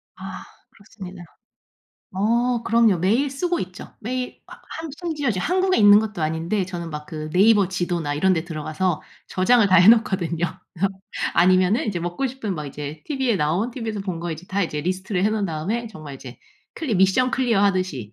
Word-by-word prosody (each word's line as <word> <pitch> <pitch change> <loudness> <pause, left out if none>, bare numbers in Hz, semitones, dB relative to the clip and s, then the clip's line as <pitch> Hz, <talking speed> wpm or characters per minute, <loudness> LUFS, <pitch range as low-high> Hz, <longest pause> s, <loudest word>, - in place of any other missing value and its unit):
아 - - -8 0.3
그렇습니다. 190 -3 -11 0.9
어 235 +5 +1
그럼요. 230 -5 +3
매일 230 - +2
쓰고 345 +6 -1
있죠. 185 0 -8
매일 250 +3 -4
하 - - -12 0.2
한 320 -2 -5
심지어 300 -7 -1
이제 185 -3 -2
한국에 370 - +1
있는 205 -1 +8
것도 215 -5 -5
아닌데 165 +6 -1
저는 170 -2 -6
막 150 0 -7
그 155 -2 -6
네이버 200 +1 +4
지도나 175 -5 -2
이런 190 +6 +3
데 160 - -2
들어가서 160 +1 -2 0.3
저장을 220 +4 +4
다 185 - +5
해 180 +3 +7
놓거든요. 180 -7 +3 0.3
그래서 195 +4 +1 0.5
아니면은 185 - +4
이제 195 -5 -1
먹고 175 +10 -2
싶은 240 -6 -4
막 150 -3 -5
이제 145 +2 -7
TV에 265 -7 0
나온 170 +9 0
TV에서 225 -4 -4
본 185 -4 -4
거 170 0 -4
이제 160 +3 -9
다 200 +1 -1
이제 150 -3 -2
리스트를 185 +2 -1
해 215 - +3
놓은 210 -2 0
다음에 190 +9 -3
정말 155 -9 -9
이제 130 -2 -11 0.4
클리 290 -10 -2
미션 195 +7 +3
클리어하듯이 190 - 0
190 Hz, 385 characters per minute, -23 LUFS, 170-230 Hz, 0.9 s, 있는